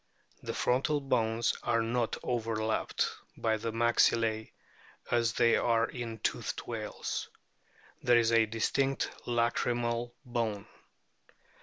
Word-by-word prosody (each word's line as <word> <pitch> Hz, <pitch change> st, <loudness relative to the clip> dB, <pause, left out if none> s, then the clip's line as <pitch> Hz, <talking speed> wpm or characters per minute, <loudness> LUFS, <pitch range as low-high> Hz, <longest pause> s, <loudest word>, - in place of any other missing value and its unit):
The -, -, -4 dB
frontal 135 Hz, +4 st, +1 dB
bones 115 Hz, -4 st, +1 dB
are 115 Hz, -1 st, +1 dB
not 115 Hz, 0 st, 0 dB
overlapped 110 Hz, -2 st, 0 dB, 0.3 s
by 110 Hz, -1 st, +1 dB
the 115 Hz, +1 st, -3 dB
maxillae 115 Hz, -1 st, +2 dB, 0.6 s
as 115 Hz, -1 st, +2 dB
they 115 Hz, -1 st, +4 dB
are 115 Hz, -1 st, +3 dB
in 120 Hz, -4 st, -5 dB
toothed -, -, -2 dB
whales. -, -, -4 dB, 0.7 s
There 120 Hz, -1 st, +5 dB
is 115 Hz, -1 st, +3 dB
a 115 Hz, -1 st, +5 dB
distinct 135 Hz, +5 st, 0 dB, 0.2 s
lacrymal 120 Hz, 0 st, 0 dB
bone. 115 Hz, -5 st, -2 dB
115 Hz, 110 wpm, -31 LUFS, 115-120 Hz, 0.7 s, There